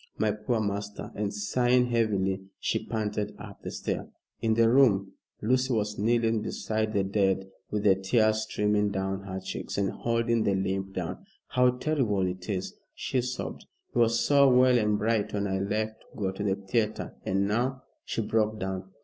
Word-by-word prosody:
My 110 - +2
poor 105 +3 -1
master," 100 -1 -3
and 105 -1 -2
sighing 120 +4 +2
heavily, 100 -5 +1 0.2
she - - -1
panted 105 -1 -2
up - - -10
the - - -5
stair. - - -3 0.3
In 110 -1 +2
the 115 0 +5
room, 115 -6 +4 0.3
Lucy 130 +3 +2
was 105 -2 -1
kneeling 115 0 +2
beside 110 0 -2
the 100 -2 +2
dead, 95 -1 +1 0.2
with 105 -1 -2
the 100 - +6
tears 110 +3 +2
streaming 105 -1 +1
down 95 0 -2
her 95 -1 -4
cheeks 95 - -5
and 100 -1 +1
holding 115 0 0
the 100 - +2
limp 95 0 -2
hand. 90 -3 -3 0.3
"How 125 0 +4
terrible 125 -10 +1
it 90 +1 -5
is!" 95 -2 -2 0.2
she 130 - -1
sobbed. 125 +1 -5 0.3
"He - - +1
was 115 0 +4
so 140 -1 +5
well 125 0 +5
and 105 -1 +2
bright 110 0 0
when 100 0 0
I 95 -1 -1
left 110 +2 -2
to - - -19
go 95 -3 -1
to 95 +2 -5
the 95 -1 +2
theatre, 105 +2 -1
and 95 +1 +1
now" 125 +5 0 0.2
she - - -2
broke 110 0 +1
down. 95 0 -4
105 Hz, 180 wpm, -28 LUFS, 95-115 Hz, 0.3 s, the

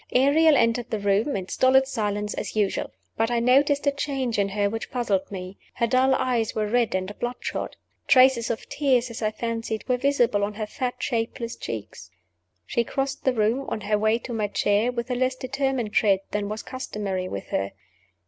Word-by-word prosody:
Ariel 290 +4 +5
entered 230 +1 +1
the 220 - -1
room 205 +6 +1
in 185 -2 -3
stolid 265 +4 +4
silence, 210 -5 -2
as - - -5
usual. 205 -3 0 0.3
But 225 +1 +1
I 240 -1 +1
noticed 280 +4 +3
a 285 - +4
change 270 -5 -2
in 200 0 +1
her 205 +1 +1
which 225 +2 -4
puzzled 210 -7 -1
me. 185 0 -7 0.2
Her 235 - +1
dull 260 +2 +3
eyes 240 -4 0
were 215 - 0
red 230 -1 +1
and 185 +2 -2
bloodshot. 240 +1 -4 0.3
Traces 255 -3 +5
of 230 - -3
tears 255 -4 +1
(as 230 - -7
I 215 - +2
fancied) 225 0 -4
were 250 - +2
visible 245 -6 +2
on 205 +1 -2
her 215 0 -3
fat, 245 +3 -3
shapeless 230 -1 -2
cheeks. 100 -6 -7 0.6
She 235 - 0
crossed 270 +3 -3
the 260 - +3
room, 230 +4 +1
on 215 - -3
her 210 0 +1
way 220 +1 +3
to 240 +1 -7
my 215 -2 0
chair, 205 +3 +1
with 245 +1 -4
a - - +1
less 255 +1 +1
determined 260 -4 -2
tread 195 -3 +3
than 205 -1 -2
was 215 +1 -5
customary 200 -8 -4
with 100 - -6
her. 95 0 -2
230 Hz, 195 wpm, -25 LUFS, 210-255 Hz, 0.6 s, Ariel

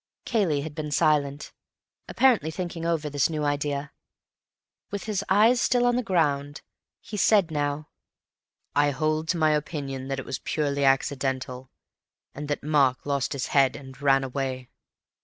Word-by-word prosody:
Cayley 185 - +1
had 155 +1 -6
been 150 0 -4
silent, 145 -1 +1 0.5
apparently 245 - +3
thinking 170 -1 -4
over 160 -3 0
this 145 0 +1
new 155 -2 -2
idea. 145 0 -1 1.0
With 200 -1 -4
his 205 -2 -2
eyes 225 +5 +5
still 245 0 +2
on 245 0 +3
the 250 - +1
ground, 145 - 0 0.4
he 210 - -7
said 200 -5 +4
now: 145 0 -2 0.9
"I 145 0 +4
hold 155 +3 -1
to 175 - 0
my 155 -1 +3
opinion 140 -3 -3
that 135 0 -2
it - - -6
was 130 - -4
purely 140 -2 -1
accidental, 135 -1 0 0.6
and 145 +1 -6
that 145 - -3
Mark 140 -4 +2
lost 140 -1 -1
his 135 -3 -2
head 135 -2 +4
and 135 -1 -11
ran 135 -1 +4
away." 130 -1 -4
145 Hz, 155 wpm, -26 LUFS, 140-160 Hz, 1.0 s, eyes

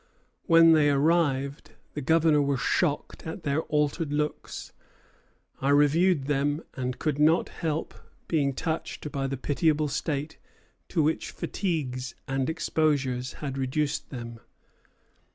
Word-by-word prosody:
When 165 -2 +7
they 155 -2 +5
arrived, 140 -2 +1 0.2
the 150 - -4
Governor 160 +1 +4
was 140 -2 0
shocked 155 +1 -1
at 160 +3 -6
their 145 +1 +1
altered 150 0 -1
looks. 150 0 -3 0.9
"I 135 - +1
reviewed 150 +3 +4
them, 145 +2 0
and 125 -1 -3
could 150 -2 -1
not 155 +3 +4
help 160 -1 -3 0.3
being 140 -4 +1
touched 160 0 -4
by 135 -1 -2
the 135 0 -3
pitiable 150 +2 +1
state 150 +1 -3 0.5
to 165 -4 +1
which 155 +2 0
fatigues 130 -9 -3
and 135 +1 -1
exposures 140 -6 0
had 135 -1 -3
reduced 140 +3 -1
them. 115 -2 -7
145 Hz, 125 wpm, -27 LUFS, 135-160 Hz, 0.9 s, When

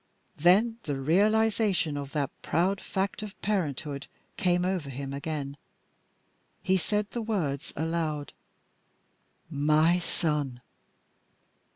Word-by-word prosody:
Then 200 +9 +4
the 145 -3 -2
realisation 205 - +3
of 140 -1 -4
that 145 -2 0
proud 190 +3 +1
fact 195 +2 -2
of 210 -1 -8
parenthood 150 -8 -1 0.3
came 180 -4 +2
over 180 -6 -1
him 135 +1 -5
again. 140 -1 -4 1.1
He 190 - +3
said 210 +2 0
the 240 - -2
words 165 -10 -2
aloud, 160 -2 -2 1.1
"My 155 +3 +3
son!" 150 -7 -1
165 Hz, 100 wpm, -28 LUFS, 145-195 Hz, 1.1 s, Then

